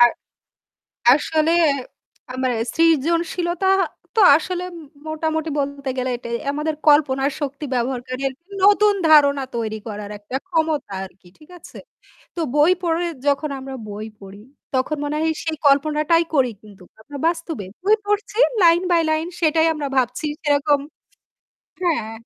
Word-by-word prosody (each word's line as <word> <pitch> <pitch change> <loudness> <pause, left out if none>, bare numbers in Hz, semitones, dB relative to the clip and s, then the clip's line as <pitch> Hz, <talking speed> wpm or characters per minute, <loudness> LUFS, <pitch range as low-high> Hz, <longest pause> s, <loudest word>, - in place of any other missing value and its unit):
আর 240 0 +8 1.0
আসলে 310 +2 +1 0.8
আমার 255 0 -1 0.2
সৃজনশীলতা 335 +3 +1 0.5
তো 445 - +4 0.2
আসলে 360 +3 -4 0.4
মোটামুটি 315 0 -2
বলতে 280 -1 -3
গেলে 255 0 -1
এটাই 235 -1 -4
আমাদের 300 +2 -2
কল্পনা 290 -3 +4 0.2
শক্তি 280 +1 -4
ব্যবহারকারী 255 +1 -3 0.4
নতুন 415 +1 +5 0.2
ধারণা 285 -3 +5
তৈরি 220 -2 -3
করার 210 -1 -6
একটা 205 +5 -8
ক্ষমতা 320 - -1
আরকি। 185 -1 -14
ঠিক 305 - -19
আছে? - - -13 0.6
তো - - -5 0.2
বই 300 +4 +5
পড়ে 340 0 0 0.2
যখন 285 +1 +1
আমরা 265 0 -7
বই 210 +1 -6
পড়ি, 195 +1 -12 0.3
তখন 260 +4 0
মনে 290 +1 -2
হয় 320 0 +1
সেই 320 -1 -3
কল্পনাটাই 305 +4 +3
করি 255 -4 +3
কিন্তু 205 -3 -16 0.2
আমরা 285 +6 -9
বাস্তবে। 330 - -3 0.2
বই 415 +3 +5
পড়ছি 415 +1 -2 0.3
লাইন 335 +1 +6
বাই 335 - +4
লাইন 315 +2 0
সেটাই 320 0 +3
আমরা 300 -2 -4
ভাবছি 255 +4 0 0.2
সেরকম 290 -1 +2 1.0
হ্যাঁ 310 -11 0
295 Hz, 130 wpm, -21 LUFS, 260-325 Hz, 1.0 s, আর